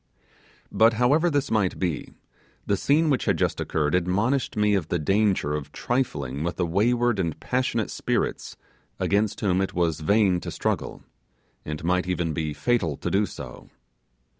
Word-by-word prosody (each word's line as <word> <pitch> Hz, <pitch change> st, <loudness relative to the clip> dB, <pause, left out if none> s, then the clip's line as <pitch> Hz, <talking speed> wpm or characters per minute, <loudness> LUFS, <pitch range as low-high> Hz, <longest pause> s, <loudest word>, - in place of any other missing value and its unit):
But 115 Hz, +1 st, +4 dB
however 140 Hz, +9 st, +3 dB
this 145 Hz, -2 st, -1 dB
might 105 Hz, -5 st, +1 dB
be, 85 Hz, -5 st, -3 dB, 0.5 s
the 100 Hz, -, +1 dB
scene 150 Hz, +9 st, +2 dB
which 135 Hz, -, 0 dB
had -, -, +2 dB
just -, -, 0 dB
occurred 75 Hz, -2 st, -1 dB
admonished 100 Hz, +11 st, 0 dB
me 105 Hz, 0 st, +3 dB
of 95 Hz, -6 st, 0 dB
the 85 Hz, -, 0 dB
danger 95 Hz, -2 st, +1 dB
of 75 Hz, -1 st, -4 dB
trifling 75 Hz, -, -2 dB
with 85 Hz, +1 st, -2 dB
the 90 Hz, -, 0 dB
wayward 120 Hz, +5 st, +1 dB
and 85 Hz, -4 st, -2 dB
passionate 125 Hz, -3 st, -1 dB
spirits -, -, -2 dB, 0.4 s
against 105 Hz, +1 st, 0 dB
whom 95 Hz, -2 st, +2 dB
it 95 Hz, -, -3 dB
was 85 Hz, -3 st, +1 dB
vain 95 Hz, +2 st, +3 dB
to -, -, -6 dB
struggle, -, -, -3 dB, 0.6 s
and 75 Hz, 0 st, -5 dB
might 90 Hz, +2 st, +1 dB
even 85 Hz, -3 st, -1 dB
be 80 Hz, -1 st, -2 dB
fatal 85 Hz, -, 0 dB
to -, -, -3 dB
do 100 Hz, +1 st, +2 dB
go. -, -, -9 dB
95 Hz, 165 wpm, -25 LUFS, 85-115 Hz, 0.6 s, But